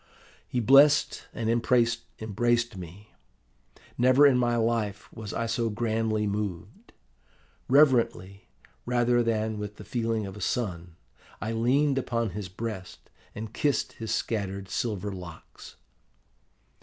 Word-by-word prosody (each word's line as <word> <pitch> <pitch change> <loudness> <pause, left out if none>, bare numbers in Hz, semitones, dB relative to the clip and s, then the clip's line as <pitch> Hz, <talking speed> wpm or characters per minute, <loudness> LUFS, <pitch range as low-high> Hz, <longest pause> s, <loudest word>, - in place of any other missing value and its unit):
"He 125 - -1
blessed 140 +5 +5
and 115 -2 -4
embraced 115 -1 0
me. 95 +4 -10 0.9
Never 130 +3 +6
in 140 -3 +6
my 120 -1 +2
life 110 -3 -1
was 110 -2 -7
I 115 - -2
so 115 0 -1
grandly 110 -1 -1
moved. 100 -4 -5 0.8
Reverently, 120 -8 +3 0.4
rather 120 0 +2
than 110 -2 -1
with 105 0 -6
the - - -11
feeling 115 -3 -1
of 95 0 -8
a 105 - -9
son, 90 -7 -3 0.4
I 110 - -3
leaned 135 +5 +2
upon 115 -4 -2
his 100 0 -6
breast, 95 -2 -7 0.2
and 110 +1 -7
kissed 145 -5 0
his 110 -1 -6
scattered 100 -3 -2
silver 105 -1 -2
locks. 90 -4 -11
115 Hz, 120 wpm, -27 LUFS, 105-120 Hz, 0.9 s, Never